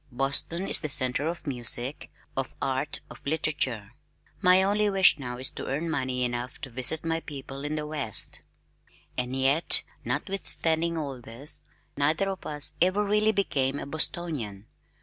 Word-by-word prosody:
Boston 140 Hz, +8 st, 0 dB
is -, -, +6 dB
the 155 Hz, -, -3 dB
center 130 Hz, +1 st, +1 dB
of 170 Hz, 0 st, -4 dB
music, 125 Hz, 0 st, +3 dB, 0.3 s
of 135 Hz, -1 st, -2 dB
art, 135 Hz, +2 st, -1 dB
of -, -, -13 dB
literature. 140 Hz, -8 st, -1 dB, 0.5 s
My 185 Hz, 0 st, +6 dB
only 205 Hz, +2 st, +2 dB
wish 190 Hz, -5 st, +5 dB
now 125 Hz, -2 st, -5 dB
is 130 Hz, +1 st, 0 dB
to -, -, -7 dB
earn 160 Hz, +5 st, -2 dB
money 130 Hz, -4 st, -1 dB
enough 120 Hz, +1 st, -4 dB
to 135 Hz, -, -7 dB
visit 130 Hz, +7 st, 0 dB
my 165 Hz, 0 st, 0 dB
people 140 Hz, -3 st, -8 dB
in 150 Hz, +1 st, -2 dB
the 150 Hz, -1 st, -2 dB
West. 150 Hz, -8 st, 0 dB, 0.7 s
And 125 Hz, +1 st, -2 dB
yet, 135 Hz, +5 st, +4 dB, 0.2 s
notwithstanding 170 Hz, -4 st, +1 dB
all 140 Hz, -5 st, -4 dB
this, 125 Hz, +6 st, -5 dB, 0.3 s
neither 155 Hz, +7 st, +1 dB
of 190 Hz, -, -7 dB
us 150 Hz, -1 st, -5 dB
ever 185 Hz, +4 st, +3 dB
really 210 Hz, +1 st, +3 dB
became 140 Hz, -10 st, 0 dB
a -, -, -5 dB
Bostonian. 140 Hz, -, -2 dB
145 Hz, 155 wpm, -27 LUFS, 130-165 Hz, 0.7 s, is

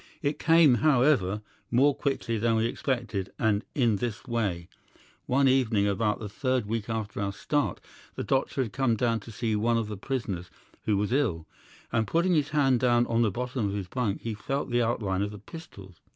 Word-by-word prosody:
It 145 Hz, +1 st, -1 dB
came, 165 Hz, -4 st, +6 dB
however, 120 Hz, -9 st, +3 dB, 0.3 s
more 135 Hz, +4 st, +4 dB
quickly 130 Hz, -5 st, -2 dB
than 115 Hz, +1 st, +2 dB
we 110 Hz, 0 st, +2 dB
expected, 115 Hz, -6 st, -2 dB
and 105 Hz, -1 st, +1 dB
in 120 Hz, -6 st, +2 dB
this 115 Hz, -1 st, -4 dB
way. 100 Hz, -9 st, -2 dB, 0.6 s
"'One 135 Hz, +2 st, +3 dB
evening, 120 Hz, -6 st, +3 dB
about 105 Hz, +1 st, +1 dB
the 110 Hz, -4 st, -6 dB
third 130 Hz, +3 st, -1 dB
week 110 Hz, +1 st, -3 dB
after 110 Hz, -3 st, -3 dB
our 100 Hz, 0 st, -1 dB
start, 145 Hz, +8 st, -1 dB, 0.4 s
the -, -, -3 dB
doctor 135 Hz, 0 st, 0 dB
had 115 Hz, -, -7 dB
come 130 Hz, -4 st, +2 dB
down 115 Hz, 0 st, +1 dB
to 115 Hz, -, -11 dB
see 110 Hz, 0 st, -1 dB
one 115 Hz, +2 st, +2 dB
of 110 Hz, -2 st, -2 dB
the 105 Hz, -, -5 dB
prisoners 100 Hz, -7 st, -3 dB, 0.4 s
who 105 Hz, -2 st, +2 dB
was 105 Hz, +4 st, 0 dB
ill, 105 Hz, -, 0 dB, 0.5 s
and 110 Hz, -2 st, +1 dB
putting 170 Hz, -, +2 dB
his 150 Hz, -3 st, +2 dB
hand 135 Hz, -5 st, +3 dB
down 120 Hz, -1 st, +3 dB
on 115 Hz, 0 st, +1 dB
the 115 Hz, -, +3 dB
bottom 125 Hz, +1 st, -2 dB
of 100 Hz, -, -3 dB
his 100 Hz, -3 st, -4 dB
bunk 110 Hz, -1 st, -2 dB
he 115 Hz, -, -3 dB
felt 135 Hz, +6 st, -3 dB
the 120 Hz, 0 st, +2 dB
outline 105 Hz, -5 st, 0 dB
of 100 Hz, -, 0 dB
the 105 Hz, -, -9 dB
pistols. 100 Hz, -, -12 dB
115 Hz, 195 wpm, -28 LUFS, 105-130 Hz, 0.6 s, came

